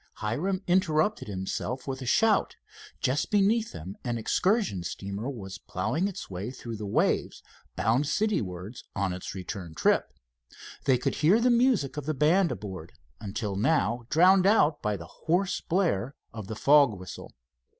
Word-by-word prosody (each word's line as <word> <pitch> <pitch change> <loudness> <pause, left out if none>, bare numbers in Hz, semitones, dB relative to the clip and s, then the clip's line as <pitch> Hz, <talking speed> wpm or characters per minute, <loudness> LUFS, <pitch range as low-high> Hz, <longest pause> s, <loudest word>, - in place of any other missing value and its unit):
Hiram 175 - -2
interrupted 180 - +1
himself 105 +7 -4
with 135 0 -4
a 130 - -6
shout. 215 - +3 0.5
Just 130 +3 0
beneath 215 +2 +2
them 90 +4 -8
an 120 -2 -2
excursion 185 - +1
steamer 100 +7 -5
was 100 -8 -7
ploughing 150 - -1
its 200 - -6
way 95 +4 -5
through 120 -3 -7
the 105 -1 -5
waves, - - 0 0.3
bound 120 +7 +2
citywards 110 - -2
on 100 -2 0
its 90 +1 -6
return 90 -3 -6
trip. - - +2 0.7
They 130 -2 +4
could 125 - -1
hear 175 +9 +4
the 245 +1 +3
music 235 - +2
of 150 -1 -5
the 155 - 0
band 170 +6 +3
aboard, 95 -4 -7 0.3
until 105 -1 -4
now 115 0 +1
drowned 185 +3 +5
out 165 -8 +3
by 105 -2 -1
hoarse 170 - -1
blare 160 - 0 0.2
of 110 -4 -7
the 110 - -5
fog 140 -3 +5
whistle. 95 - -9
130 Hz, 150 wpm, -28 LUFS, -, 0.7 s, drowned